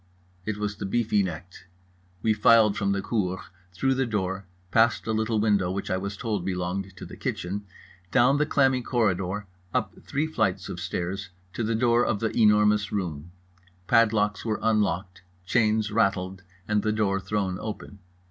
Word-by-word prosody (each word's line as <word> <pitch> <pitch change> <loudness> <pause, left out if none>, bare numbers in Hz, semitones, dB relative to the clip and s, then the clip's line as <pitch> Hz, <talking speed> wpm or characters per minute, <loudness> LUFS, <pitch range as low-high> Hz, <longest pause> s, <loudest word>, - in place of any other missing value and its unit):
It 110 -1 -1
was 105 0 -3
the 100 - -4
beefy 105 0 +2
necked. 90 0 -6 0.6
We 110 - +3
filed 110 0 +5
from 100 -1 0
the 100 0 -1
cour, 95 -5 -1 0.3
through 135 +9 +1
the 130 -1 0
door, 95 -3 -2 0.2
past 110 -3 +3
a 110 - -1
little 110 0 0
window 100 -4 +2
which 95 +1 -3
I 95 - +1
was 100 +1 -4
told 105 -6 -2
belonged 95 +1 -3
to - - -8
the - - -10
kitchen, 100 +3 -4 0.4
down 130 +5 +4
the 150 0 +1
clammy 135 -3 +3
corridor, 105 -5 0 0.3
up - - 0
the - - -18
three 145 +3 -1
flights 100 - -1
of - - -5
stairs, 95 +2 -3 0.2
to 120 - -2
the 115 +1 0
door 120 +1 +3
of 110 -4 0
The 110 0 -2
Enormous 105 -1 +4
Room. 85 -5 -3 0.5
Padlocks 105 -2 +3
were 110 -2 -1
unlocked, 105 -4 0 0.2
chains 110 +1 +2
rattled, 95 -4 0 0.3
and 105 -1 +2
the 110 - 0
door 105 -3 +1
thrown 95 -1 -2
open. 105 -2 -7
105 Hz, 170 wpm, -26 LUFS, 95-110 Hz, 0.6 s, filed